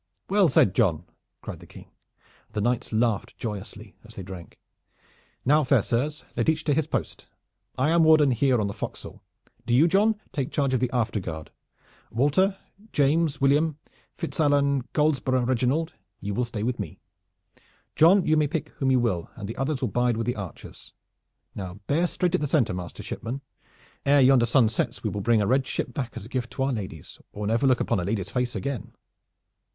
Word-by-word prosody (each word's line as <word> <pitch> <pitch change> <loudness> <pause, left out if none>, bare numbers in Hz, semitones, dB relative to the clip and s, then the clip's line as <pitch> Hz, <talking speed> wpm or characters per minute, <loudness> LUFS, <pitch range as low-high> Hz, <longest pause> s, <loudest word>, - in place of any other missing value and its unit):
"Well 200 -4 +5
said, 100 -7 +4
John!" 85 -7 +2 0.4
cried - - -7
the - - -14
King, - - -14 0.6
and - - -33
the 105 - -1
knights 120 +2 0
laughed 110 -2 0
joyously 105 -1 -7
as 110 0 -14
they 95 - -6
drank. 90 -2 -10 0.9
"Now, 150 +4 +4
fair 130 -5 +3
sirs, 145 +6 -2
let - - +1
each 160 0 0
to 145 - +1
his 155 0 0
post! - - -4 0.5
I 135 +5 +2
am 170 0 +4
warden 155 -3 +6
here 125 0 +2
on 105 - 0
the 100 - -3
forecastle. - - -7 0.5
Do 120 - +3
you, 150 +7 +6
John, 210 +4 +3
take 140 -3 -2
charge 140 -3 0
of 130 - +2
the 125 0 0
afterguard. 95 -10 -2 0.6
Walter, 165 - +2 0.3
James, 150 +1 +2
William, 145 +3 +2 0.4
Fitzallan, 145 -5 +1
Goldesborough, 135 -4 +1
Reginald 130 +6 0 0.3
you 100 +1 -4
will 125 +4 0
stay 110 -3 -5
with 125 +1 -1
me! - - -5 1.0
John, 180 +4 +6
you 155 - +3
may 150 -1 +3
pick 155 -1 -3
whom 135 - +1
you 130 -1 +4
will 95 -9 -1
and 100 -3 -7
the 115 - -6
others 135 +1 -1
will 130 - +1
bide 120 +2 +1
with 115 - -2
the 120 - -1
archers. 100 -4 -9 0.6
Now 90 -3 -6
bear 165 - +2
straight 180 0 -1
at 185 - +1
the 150 - 0
center, 135 - +2
master 90 -1 -7
shipman. 125 +4 -5 0.6
Ere 140 0 +5
yonder 130 -2 +5
sun 120 -1 +4
sets 110 - -2
we - - -1
will 105 - -3
bring 115 0 +3
a - - 0
red 130 +4 +2
ship 125 - -3
back 125 -2 -4
as - - -7
a - - -11
gift 125 -3 -3
to 130 - -1
our 135 0 0
ladies, 95 -9 -7
or 105 0 -5
never 115 +6 +2
look 130 -2 +3
upon - - 0
a - - -2
lady's 100 0 -2
face 125 0 -1
again." 140 -6 -4
130 Hz, 195 wpm, -26 LUFS, 110-145 Hz, 1.0 s, warden